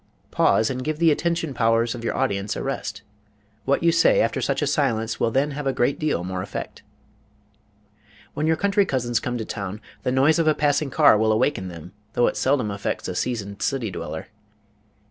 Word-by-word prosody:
Pause, 110 +3 +3
and 130 0 -4
give 155 +1 -2
the 165 0 +4
attention 165 -1 -1
powers 115 -1 +2
of 120 -2 -8
your - - -2
audience 100 +1 -1
a - - -4
rest. 115 -5 -4 0.6
What 140 +4 +1
you 170 - +5
say 165 0 +4
after 115 - +1
such 140 +1 0
a - - +2
silence 115 -6 0
will - - +2
then 135 +5 +1
have 145 0 -4
a 135 - +1
great 135 +3 0
deal 150 - 0
more 90 0 -3
effect. - - -6 1.5
When 150 +2 -1
your 160 - +3
country 200 +2 +2
cousins 120 -3 0
come 120 0 -3
to 110 - -4
town, 100 -1 -5 0.2
the 125 - -1
noise 140 +6 +3
of 165 - +2
a 155 - +4
passing 145 0 +1
car 110 - +5
will 110 0 +3
awaken 110 -3 +1
them, 85 -1 -9 0.2
though 120 - +3
it - - 0
seldom 130 -6 +1
affects 100 0 -3
a - - -3
seasoned 100 -5 -3
city 125 -7 -1
dweller. 80 -3 -6
125 Hz, 200 wpm, -23 LUFS, 110-145 Hz, 1.5 s, you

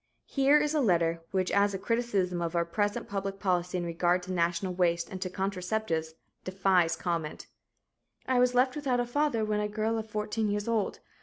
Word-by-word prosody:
Here 275 +1 +4
is 300 0 0
a 305 - +2
letter, 170 -6 +2
which 185 -1 0
as 200 0 +3
a - - -1
criticism 195 -5 0
of 170 0 -2
our 170 0 +2
present 205 +4 -1
public 195 0 -4
policy 180 -2 0
in 175 - -2
regard 175 +1 +1
to 185 - -6
national 175 +1 0
waste 170 -2 +1
and 185 - -6
to 185 - -2
contraceptives, 180 -3 -2 0.3
defies 185 -3 +2
comment: 165 -4 -3 0.8
"I 255 -1 +2
was 250 0 +3
left 255 +1 +3
without 270 -4 0
a 245 - +1
father 240 -3 0
when 210 0 0
a 210 - 0
girl 220 +2 -1
of 220 0 -7
fourteen 210 0 -1
years 205 +1 -2
old. 225 -4 -1
195 Hz, 190 wpm, -29 LUFS, 175-220 Hz, 0.8 s, Here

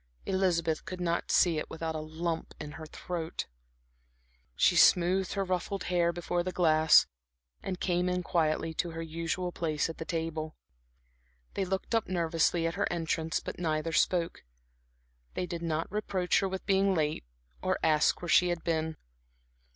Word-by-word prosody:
Elizabeth 170 -4 +1
could 180 +1 -7
not 170 -1 -1
see 170 -3 +4
it - - -6
without 160 0 -4
a 155 - -3
lump 160 +2 -4
in 150 -1 -6
her 155 +1 -9
throat. 165 0 -5 1.1
She - - +4
smoothed 185 +1 +4
her 195 - 0
ruffled 185 +1 -2
hair 170 -1 +3
before 175 0 -2
the 185 +1 -3
glass 160 -3 +5 0.6
and 185 -1 -4
came 180 0 +1
in 180 0 -1
quietly 160 -1 0
to 170 +2 -1
her 165 - -5
usual 165 +2 -3
place 160 -2 -1
at - - -14
the - - -3
table. 160 -2 -3 1.0
They 195 - -1
looked 190 +4 -3
up 225 -2 +1
nervously 165 -1 +1
at 165 - 0
her 200 0 -1
entrance, 165 -1 -1
but - - -7
neither 160 -1 -1
spoke; 170 +1 +1 0.9
they 180 - -1
did 170 -1 -5
not 165 -1 -1
reproach 190 -3 +1
her 195 - 0
with 190 0 -5
being 195 -1 +3
late 155 -2 0 0.4
or - - 0
ask 155 +1 +3
where 175 - -4
she 180 - +5
had 175 -1 -2
been. 160 -1 -1
170 Hz, 165 wpm, -30 LUFS, 160-180 Hz, 1.1 s, glass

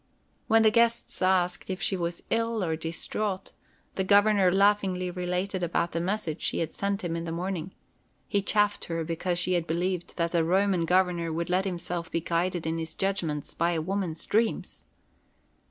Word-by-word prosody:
When 225 0 +5
the 220 - +6
guests 235 +1 +2
asked 185 -1 +2
if 185 0 -3
she 195 - +1
was 170 -1 -3
ill 230 -2 +1
or 160 -2 0
distraught, 185 +5 -3 0.4
the 190 - -1
Governor 200 -1 +5
laughingly 195 -2 +2
related 180 +1 -2
about 170 0 0
the 165 - -1
message 180 -3 -2
she - - 0
had 165 -1 -2
sent 200 -1 -2
him 170 -1 -2
in 165 0 -3
the 165 - -4
morning. 180 +1 -4 0.5
He 200 - +1
chaffed 205 +1 +1
her 165 -1 -2
because 170 +2 -2
she 180 +1 +1
had 175 -2 0
believed 175 +2 -2
that 170 0 0
a 170 -1 +3
Roman 185 0 +2
governor 180 -2 +2
would 170 +2 -2
let 185 +2 +2
himself 175 -2 -4
be 170 - 0
guided 170 +1 -1
in 165 +1 -1
his 160 -1 -5
judgments 165 -7 -2
by 170 +1 +1
a 165 - 0
woman's 180 -1 -2
dreams. 225 +1 0
180 Hz, 180 wpm, -28 LUFS, 170-195 Hz, 0.5 s, the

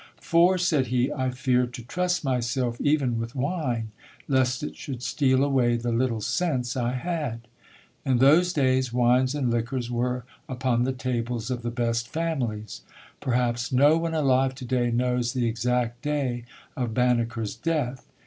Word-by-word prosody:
"For", 175 +3 +4
said 160 -7 +1
he, 125 +1 +1
"I 130 -2 -1
feared 125 -1 0
to 120 - -8
trust 180 +8 -1
myself 125 -1 -1
even 140 -6 +1
with 115 +3 -5
wine, 130 -6 -2 0.4
lest 130 -1 +1
it - - -5
should 125 -3 -7
steal 130 -2 +2
away 130 -4 +2
the 120 0 -2
little 115 -1 0
sense 130 - -1
I 125 -1 -1
had." 140 -4 -3 0.6
In 130 -2 +2
those 155 +8 +5
days 130 -4 +1
wines 125 +2 +3
and 130 -5 0
liquors 120 +1 -2
were 125 0 -1 0.2
upon 125 -2 0
the 130 - 0
tables 125 -2 -3
of 125 -1 -2
the 120 - -3
best 115 0 -1
families. 120 -9 -3 0.4
Perhaps 120 -2 0
no 145 +4 +5
one 165 0 -1
alive 135 -3 +2
today 125 -2 -1
knows 125 0 0
the 125 -2 0
exact 120 +1 -1
day 135 -5 -2 0.3
of 120 -4 -3
Banneker's 120 -3 0
death. 140 -7 -2
125 Hz, 155 wpm, -26 LUFS, 120-135 Hz, 0.6 s, those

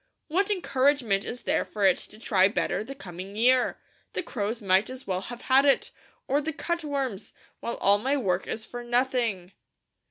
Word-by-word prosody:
What 390 +6 +1
encouragement 270 - +2
is 245 - -5
there - - +1
for 205 -2 -2
it 190 - +5
to 215 - -10
try 195 -4 +3
better 210 0 -1
the 275 +5 -8
coming 190 -2 -8
year? 250 +3 +3 0.4
The - - -2
crows 225 -6 -3
might 195 0 +2
as 255 +1 -8
well 185 -1 -1
have 240 +4 -8
had 265 +1 +5
it, 280 -1 +3 0.4
or 280 +3 +2
the 315 +2 -3
cutworms; 280 - -3 0.3
while 235 - -3
all 200 +1 +3
my 270 +6 +1
work 190 -8 0
is 220 - -3
for 245 0 -7
nothing." 240 -6 0
240 Hz, 180 wpm, -27 LUFS, 200-270 Hz, 0.4 s, it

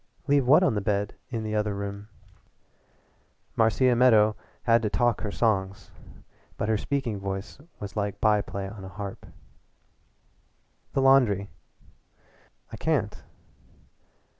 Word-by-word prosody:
"Leave 140 -3 +2
what 155 +7 +6
on 170 - +3
the 105 - -1
bed 100 0 -1 0.2
in 115 -3 -3
the 110 0 -4
other 105 -1 0
room?" 100 +1 -6 1.5
Marcia 120 +3 +3
Meadow 110 -4 +5 0.3
had 115 -1 +4
to 110 - -1
talk 120 +2 +1
her 105 - -3
songs, 100 -3 -1 0.7
but - - -2
her 110 - +2
speaking 120 -2 -2
voice 95 +4 -5 0.2
was 100 0 -7
like 105 -2 -2
byplay 100 -2 0
on 100 0 -9
a 95 - -8
harp. 100 0 -8 1.7
"The 135 - +1
laundry." 115 -8 +4 1.2
"I - - -7
can't." - - -1
105 Hz, 125 wpm, -26 LUFS, 100-120 Hz, 1.7 s, what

